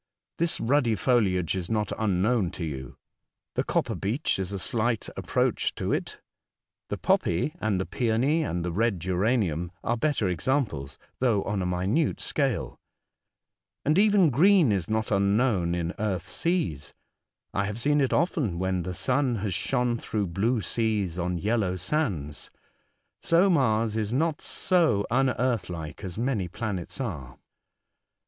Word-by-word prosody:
This 170 0 +1
ruddy 120 -2 +2
foliage 95 - +1
is 90 -2 -4
not 105 -2 0
unknown 105 0 +1
to 85 - -4
you. 65 -4 -6 0.6
The - - 0
copper - - 0
beech 110 +4 -1
is 95 0 -3
a 100 - -3
slight 115 +3 0
approach - - 0
to - - -1
it, - - -3 0.7
the - - -2
poppy, 85 - +1
and 105 -4 +1
the 95 - -1
peony, 125 +6 +1
and 90 - -2
the 90 - -2
red 105 +1 +1
geranium 90 -2 0
are 120 - +1
better 125 -4 0
examples 90 - -1 0.2
though 115 -6 +2
on 100 -1 -2
a 90 - -1
minute 95 - 0
scale. 135 -6 -1 1.1
And 155 +6 +3
even 200 -6 +5
green 170 - +5
is 95 -4 -1
not 110 0 -1
unknown 100 -3 +2
in 85 0 -2
earth 95 -4 -1
seas. 90 - -2 0.6
I 100 - 0
have 105 +3 -4
seen 145 +4 +2
it 135 - +1
often 145 - +1
when 95 0 0
the 90 +1 -4
sun 130 +3 +1
has 100 -3 -2
shone 125 +3 0
through 105 -2 -2
blue 115 +5 +1
seas 105 -6 -1
on 90 0 -1
yellow 100 0 0
sands 90 - -2 0.4
— - - -44 0.3
so 175 +4 +4
Mars 115 -8 +2
is 110 -1 -1
not 155 +4 0
so 160 - +2
unearth 125 -3 +1
like 80 0 -7
as 95 -1 -6
many 115 -6 -1
planets 100 0 -4
are. 75 - -5
110 Hz, 150 wpm, -27 LUFS, 90-130 Hz, 1.1 s, even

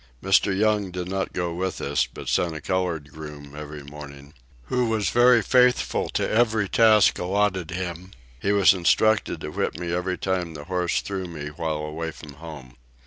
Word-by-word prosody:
Mr. 95 0 +3
Young 105 -2 +2
did 90 0 -5
not 95 +1 -2
go 85 -2 -2
with 95 +2 -3
us, 70 0 0
but - - -9
sent 85 -2 +1
a - - -5
colored 85 -6 -2
groom 75 -2 -10
every 75 -1 -8
morning, 70 0 -11 0.3
who 125 - 0
was 110 -3 0
very 120 -1 +5
faithful 125 +3 +2
to - - -1
every 110 -2 +2
task 110 -1 +5
alloted 95 -2 0
him; 90 0 -5 0.3
he 100 - 0
was 100 -2 +6
instructed 95 0 +2
to 75 - -5
whip - - -2
me 85 0 -3
every 90 +1 -1
time 90 -2 -2
the 75 - -7
horse 90 0 -1
threw 95 -2 -4
me 75 -4 -6
while 80 0 -3
away 80 +2 -4
from 75 -2 -11
home. 70 -5 -11
90 Hz, 180 wpm, -24 LUFS, 75-100 Hz, 0.3 s, was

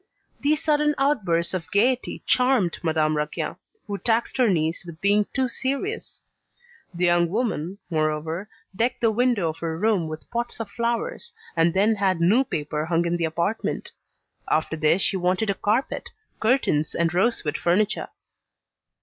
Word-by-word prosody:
These 295 +1 +1
sudden 300 -1 +2
outbursts 195 - +1
of 180 -3 -4
gaiety 245 +5 +1
charmed 250 -9 +2
Madame 155 -2 +1
Raquin, 150 0 -2 0.3
who 200 -1 -4
taxed 230 +4 +1
her 250 -3 +4
niece 165 -2 0
with 170 -2 -10
being 205 +2 +3
too 260 -1 +1
serious. 275 - -3 0.7
The 180 0 0
young 175 -1 +3
woman, 200 -4 -2
moreover, 160 +4 -1 0.3
decked 235 +5 0
the 225 -2 +4
window 230 -6 +2
of 160 - -6
her 165 -1 -3
room 200 -3 +1
with 155 0 -7
pots 240 0 -3
of 220 -3 -5
flowers, 240 - -2 0.2
and 165 +1 +3
then 210 +3 +3
had 190 -3 +1
new 205 +10 +4
paper 150 - -3
hung 170 0 +1
in 170 0 0
the 170 - 0
apartment. 170 +7 -2 0.6
After 160 0 +1
this 160 +4 +2
she 195 - +1
wanted 185 +4 +1
a - - 0
carpet, 215 +7 -1 0.3
curtains 220 - +1
and 170 0 +1
rosewood 180 -5 +1
furniture. 200 +5 +1
195 Hz, 155 wpm, -24 LUFS, 165-235 Hz, 0.7 s, her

